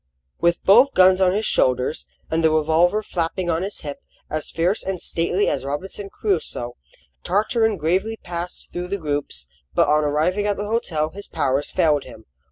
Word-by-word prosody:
With 170 0 +1
both 245 +8 +6
guns 185 +1 +6
on 185 0 +4
his 215 +1 0
shoulders, 130 +3 +1 0.2
and 165 +1 +1
the 160 - +5
revolver 160 +6 +2
flapping 175 -1 -2
on 165 +1 0
his 195 +2 -4
hip, 145 -3 -6 0.3
as 155 0 -2
fierce 175 +6 0
and 190 -2 -3
stately 175 +5 0
as 135 - -1
Robinson 190 +8 -4
Crusoe, 160 - -2 0.5
Tartarin 220 +2 +1
gravely 190 +8 0
passed 175 -1 -7
through 175 0 -4
the 200 +2 -2
groups; 145 - -2 0.3
but - - +4
on 150 +1 +3
arriving 160 +8 +1
at 205 - 0
the 205 - -3
hotel 170 -9 -1
his 200 +1 -8
powers 135 +2 0
failed 155 -5 +2
him. 110 -3 -13
175 Hz, 175 wpm, -22 LUFS, 150-195 Hz, 0.5 s, both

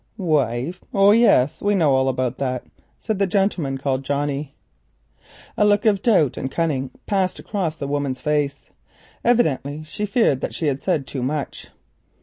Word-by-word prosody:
"'Wife!' 155 - 0
Oh, 200 +1 +6
yes, 210 - +4
we 205 0 +2
know 155 -7 +3
all 130 0 +2
about 130 -1 -2
that," 130 -2 -2 0.3
said 220 -4 -3
the 200 - +2
gentleman 180 -8 0
called 135 -1 -2
Johnnie. 140 0 -2 1.0
A - - +2
look 210 +1 +3
of 205 -3 +3
doubt 185 - +3
and 130 - -3
cunning 140 -6 -1 0.2
passed 190 -2 0
across 180 -7 -3
the 140 - -5
woman's 140 -2 -2
face. 145 0 -2 0.5
Evidently 155 - +1
she 160 +7 -4
feared 200 - +2
that - - -4
she 165 - -2
had 140 -2 0
said 165 -7 0
too 135 -1 -5
much. 140 +2 -3
150 Hz, 160 wpm, -22 LUFS, 135-195 Hz, 1.0 s, Oh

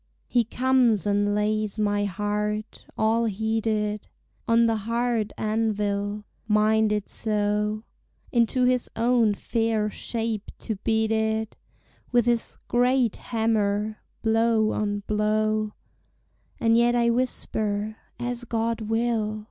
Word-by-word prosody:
He 240 -1 +3
comes 245 -4 +2
and 205 0 +1
lays 215 0 0
my 205 -1 +1
heart, 210 +2 -3
all 225 +2 +2
heated, 215 0 -1 0.4
On 230 0 +4
the 225 -1 +2
hard 230 0 -1
anvil, 210 -1 -1 0.2
minded 215 -1 +2
so 210 0 -1 0.5
Into 240 +1 +2
his 250 0 +2
own 230 -2 +3
fair 225 -1 0
shape 225 -2 -3
to 220 -3 -4
beat 220 +2 0
it 220 0 0 0.6
With 240 -2 +3
his 240 -1 0
great 245 -1 +2
hammer, 215 -2 0 0.2
blow 225 -1 +3
on 205 -1 -1
blow: 215 0 0 0.9
And 230 0 +3
yet 240 +1 +4
I 235 -1 +3
whisper, 220 -3 -1 0.2
As 245 0 -3
God 230 -1 -1
will! 225 -2 0
220 Hz, 110 wpm, -25 LUFS, 210-230 Hz, 0.9 s, On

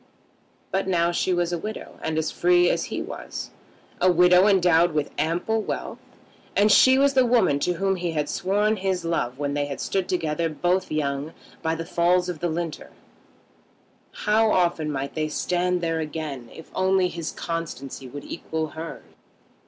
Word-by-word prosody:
But 190 0 0
now 170 -2 +2
she 175 - 0
was 175 -1 0
a 170 - -1
widow 215 +5 -7
and 160 0 -2
as 160 0 0
free 175 0 +4
as - - -1
he - - -4
was, - - -7 0.5
a 185 - +5
widow 180 +2 +6
endowed 175 -4 +4
with 150 -2 -1
ample 175 +8 0
wealth; - - -5 0.6
and 205 +1 +4
she 260 +5 +7
was 280 0 +4
the 260 -1 +5
woman 230 -12 +3
to 180 +5 0
whom 195 +2 0
he 175 -2 -2
had 150 -2 -1
sworn 205 +6 +1
his 185 -2 -1
love 130 -7 -1
when 145 0 -2
they 145 0 0
had 140 - -6
stood 190 -2 -1
together, 165 -2 0
both 180 +4 0
young, 145 0 -2 0.3
by 160 0 0
the 165 0 -5
falls 180 +2 +2
of 175 -3 -4
the 175 - -1
Linter! 165 -1 -4 1.4
How 215 +1 +4
often 170 -4 +1
might 140 0 -4
they 155 -1 -1
stand 180 +3 0
there 165 -1 -1
again 150 -6 -5
if 160 - -12
only 190 0 +2
his 170 -3 -5
constancy 140 -6 -5
would 145 +3 -8
equal 160 -2 -4
hers? 160 +2 -8
170 Hz, 175 wpm, -24 LUFS, 155-185 Hz, 1.4 s, she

